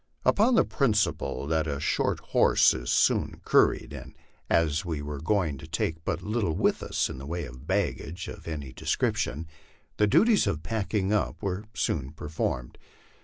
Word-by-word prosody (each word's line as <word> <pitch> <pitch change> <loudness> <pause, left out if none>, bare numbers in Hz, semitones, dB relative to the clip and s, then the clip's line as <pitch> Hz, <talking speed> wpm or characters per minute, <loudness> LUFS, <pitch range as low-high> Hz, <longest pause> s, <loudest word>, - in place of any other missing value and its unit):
Upon 230 +5 +4
the - - +5
principle 110 - 0
that 80 +1 0
a 70 -2 -2
short 75 - 0
horse - - +4
is - - -3
soon - - +2
curried, - - +3
and - - -10 0.3
as 80 -2 +2
we 80 -4 -3
were 75 -1 -5
going 80 -5 0
to 80 - -10
take 80 0 -2
but 85 +1 -2
little 105 -7 -1
with - - +1
us - - 0
in 65 - -7
the 70 - -8
way 85 +1 -3
of 65 +3 -12
baggage 95 -2 -2
of - - -9
any 70 -5 -5
description, 75 +3 -1 0.5
the 105 - +4
duties 220 - +4
of 80 0 -2
packing 105 -2 -1
up 105 - -1
were 100 +2 -2
soon 70 -7 -1
performed. 75 -5 -4
80 Hz, 170 wpm, -27 LUFS, 75-100 Hz, 0.5 s, the